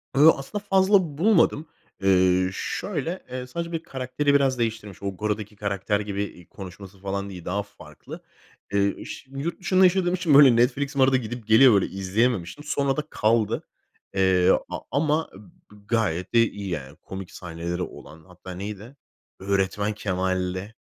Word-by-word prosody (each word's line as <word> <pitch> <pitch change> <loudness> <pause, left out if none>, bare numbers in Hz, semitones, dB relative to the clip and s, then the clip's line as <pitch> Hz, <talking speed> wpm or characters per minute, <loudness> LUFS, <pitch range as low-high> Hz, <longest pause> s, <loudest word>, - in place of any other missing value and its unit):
Yo, 155 +4 +8
aslında 200 +10 -6
fazla 190 -6 +3
bulmadım. 165 -5 +3 0.3
Eee, 95 -1 +3
şöyle, 170 - -4
eee, 125 0 -5
sadece 170 +6 -5
bir 165 -1 -3
karakteri 135 0 -1
biraz 135 -3 +2
değiştirmiş. 110 -4 -3
O, 100 -1 -3
"Gora"daki 105 0 -3
karakter 100 0 -1
gibi, 100 -1 -3
iii, 90 -3 -10
konuşması 95 0 -11
falan 100 +1 -4
değil, 90 -3 -9
daha 100 +3 -1
farklı. 100 0 -12 0.5
Eee, 100 0 0
ş 130 - -9
yurt 145 +7 -4
dışında 185 0 +3
yaşadığım 180 -1 +3
için, 180 -4 +1
böyle, 135 -4 +8
Netflix'im 135 +4 +1
arada 130 0 +5
gidip 120 -1 -6
geliyor, 115 +2 +7
böyle, 100 - +3
izleyememiştim, 100 +5 -1
sonra 140 -2 0
da 150 - -1
kaldı. 110 0 +1 0.5
Eee, 95 -1 +3 0.2
a - - -4
ama 155 +2 +1
ı 95 - -12 0.3
bı 105 -1 -18
gayet 95 -7 -1
de 120 - +5
iyi, 100 -1 -7
yani, 75 -4 -5
komik 95 +2 -9
sahneleri 85 0 -5
olan. 80 -1 -9
Hatta 90 0 -12
neydi? 105 +7 -7 0.4
Öğretmen 100 +2 0
Kemal'le 95 0 -2
105 Hz, 155 wpm, -25 LUFS, 95-140 Hz, 0.5 s, Yo